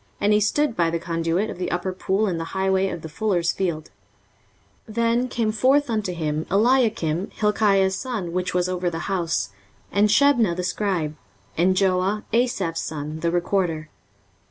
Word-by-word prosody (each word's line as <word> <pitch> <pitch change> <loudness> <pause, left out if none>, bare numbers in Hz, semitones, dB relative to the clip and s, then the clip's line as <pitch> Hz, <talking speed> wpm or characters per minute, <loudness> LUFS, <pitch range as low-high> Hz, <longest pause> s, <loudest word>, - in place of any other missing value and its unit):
And 205 +1 +3
he 210 - +4
stood 245 +5 +1
by 170 -1 +2
the 170 - -1
conduit 165 +4 -1
of - - -9
the 180 - -2
upper 180 +1 -2
pool 195 +3 0
in 180 -5 -1
the - - -2
highway 190 0 +2
of 170 - -6
the - - -5
fuller's 175 0 0
field. 170 -5 -3 1.0
23:036:003 215 - -11
Then 235 +2 +2
came 230 -3 -1
forth 260 +4 +2
unto 215 -4 -1
him 155 -2 -2
Eliakim, 210 -6 +2
Hilkiah's 200 -3 +2
son, 215 -10 -4
which 180 0 -2
was 180 0 +2
over 180 -1 -1
the 165 0 -5
house, 170 - -1 0.4
and 205 +1 +3
Shebna 235 -6 +4
the 180 - -3
scribe, 180 -6 -1 0.4
and 185 +3 +3
Joah, 190 +2 +1
Asaph's 200 -9 0
son, 155 0 -5
the 170 +1 0
recorder. 175 -3 -1
190 Hz, 170 wpm, -23 LUFS, 170-215 Hz, 1.0 s, he